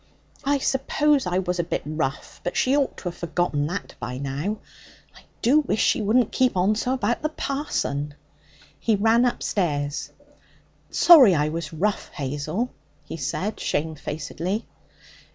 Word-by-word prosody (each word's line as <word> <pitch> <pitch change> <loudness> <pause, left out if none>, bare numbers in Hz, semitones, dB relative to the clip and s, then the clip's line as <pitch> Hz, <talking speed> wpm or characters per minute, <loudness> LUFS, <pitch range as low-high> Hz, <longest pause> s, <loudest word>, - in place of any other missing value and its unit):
'I 285 +1 +2
suppose 275 -1 +1
I 180 0 0
was 180 -1 -1
a - - +2
bit 170 - -3
rough, 150 -3 -3
but 175 - -3
she 260 +2 +3
ought 285 -2 0
to - - -10
have 175 -2 -4
forgotten 170 -4 -1
that 180 +5 -5
by 125 - -5
now. 140 +10 -3 0.6
I - - -15 0.2
do 270 +6 +5
wish 255 -7 -1
she - - +3
wouldn't 225 +2 +2
keep 255 -6 +2
on 190 +4 +3
so 245 +4 -1
about 240 -1 0
the 305 - 0
parson.' 150 - -2 0.6
He 225 - +2
ran 225 +4 +4
upstairs. 150 -11 -1 0.8
'Sorry 270 - +8
I 150 0 +1
was 160 -1 -4
rough, 190 +6 -1
Hazel,' 150 - -2 0.3
he - - -7
said 190 +8 -3
shamefacedly. 160 +6 -3
185 Hz, 150 wpm, -24 LUFS, 155-245 Hz, 0.8 s, Sorry